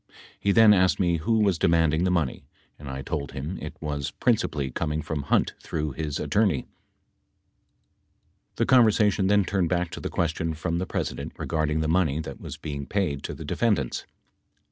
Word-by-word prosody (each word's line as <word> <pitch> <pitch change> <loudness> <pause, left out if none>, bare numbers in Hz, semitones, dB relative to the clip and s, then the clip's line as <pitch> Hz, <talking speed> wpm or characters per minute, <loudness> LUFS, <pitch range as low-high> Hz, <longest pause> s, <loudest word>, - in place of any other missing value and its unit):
He 100 - +1
then 110 0 +7
asked 95 -2 +3
me 85 -3 +2
who 110 +8 +1
was 100 -5 +2
demanding 80 0 +3
the - - +2
money 85 -8 -1 0.3
and 70 -1 -8
I 65 0 -5
told 75 -3 -4
him 75 +8 -5
it - - -7
was 75 -3 -3
principally 70 -3 0
coming 75 +2 -2
from 75 -1 -3
Hunt 70 - +1
through 75 -1 -3
his 75 +1 -4
attorney... 100 - +1 1.9
The - - +1
conversation 105 -6 +4
then 100 -1 +4
turned 90 -2 0
back 90 -1 0
to - - -6
the - - -4
question 80 -1 -1
from 85 +2 -2
the 95 - -3
President - - -3
regarding 80 -1 -1
the 80 - 0
money 80 -3 +2
that 70 -4 -7
was - - -7
being 70 -2 -6
paid 90 -9 -1
to - - -5
the - - -8
defendants. 100 - 0
80 Hz, 175 wpm, -26 LUFS, 75-95 Hz, 1.9 s, then